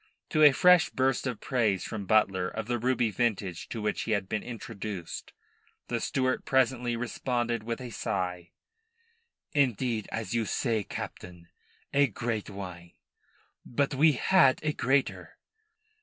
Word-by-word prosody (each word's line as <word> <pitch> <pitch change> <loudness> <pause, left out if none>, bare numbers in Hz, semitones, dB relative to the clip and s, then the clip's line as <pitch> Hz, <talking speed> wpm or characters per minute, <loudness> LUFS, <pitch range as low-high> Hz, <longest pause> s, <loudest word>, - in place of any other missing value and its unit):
To 155 - +1
a 150 -1 +9
fresh 180 +5 +5
burst 130 0 0
of 125 -4 -3
praise 110 -7 0
from 100 -3 -5
Butler 95 -4 +3
of 110 +3 -5
the 120 +1 -1
ruby 120 -1 +1
vintage 100 -6 -2
to 115 -3 -5
which 105 - -1
he 110 - -1
had 100 -2 -1
been 105 +2 -2
introduced, 105 -6 -6 0.6
the - - 0
steward 130 -1 0
presently 125 -2 +1
responded 120 -1 -2
with 115 +1 -4
a 125 -2 -7
sigh: 90 -5 -3 1.0
"Indeed, 125 -5 +1
as 110 -3 -3
you 115 -1 +1
say, 110 -1 0
Captain, 90 -2 -8 0.4
a 140 0 +5
great 115 -1 -3
wine. 90 -4 -8 0.7
But 140 +3 -1
we 150 +3 +5
had 135 0 +4
a 155 -1 0
greater." 135 +2 0
115 Hz, 140 wpm, -29 LUFS, 100-130 Hz, 1.0 s, a